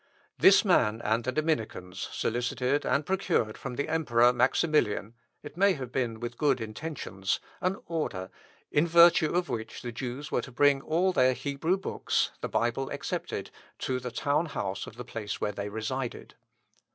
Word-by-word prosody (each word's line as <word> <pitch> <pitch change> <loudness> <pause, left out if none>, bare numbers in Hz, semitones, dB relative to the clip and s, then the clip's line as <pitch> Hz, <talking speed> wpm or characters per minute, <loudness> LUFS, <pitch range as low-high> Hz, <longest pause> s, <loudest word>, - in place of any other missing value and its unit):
This - - +7
man 105 +1 +3
and 110 +2 +1
the 130 - 0
Dominicans 120 - -2
solicited 125 +4 -1
and 140 +1 +1
procured 175 - 0
from 135 -2 -6
the 145 - -2
emperor, 125 -7 +3
Maximilian, 125 - +1 0.3
(it 145 - -9
may 200 +1 +5
have 130 -6 -6
been 120 -4 -1
with 120 0 -6
good 140 -4 +3
intentions,) 110 -4 -3 0.2
an 185 +1 0
order, 125 - -3 0.4
in 150 +4 +3
virtue 170 -1 +6
of 175 0 +1
which 110 -2 -5
the 120 - -4
Jews 130 +5 -5
were - - +1
to 135 - -9
bring 140 +2 +4
all 175 +6 +1
their 130 -5 +4
Hebrew 140 +8 -1
books 190 - -1
(the - - -3
Bible 120 +3 0
excepted) - - -4 0.3
to 130 -1 -2
the 125 0 -5
town 145 +6 0
house 95 -9 -4
of - - -10
the 125 - -8
place 105 -3 -5
where 105 - -1
they 100 0 -5
resided. 115 +4 -4
130 Hz, 165 wpm, -29 LUFS, 115-155 Hz, 0.4 s, This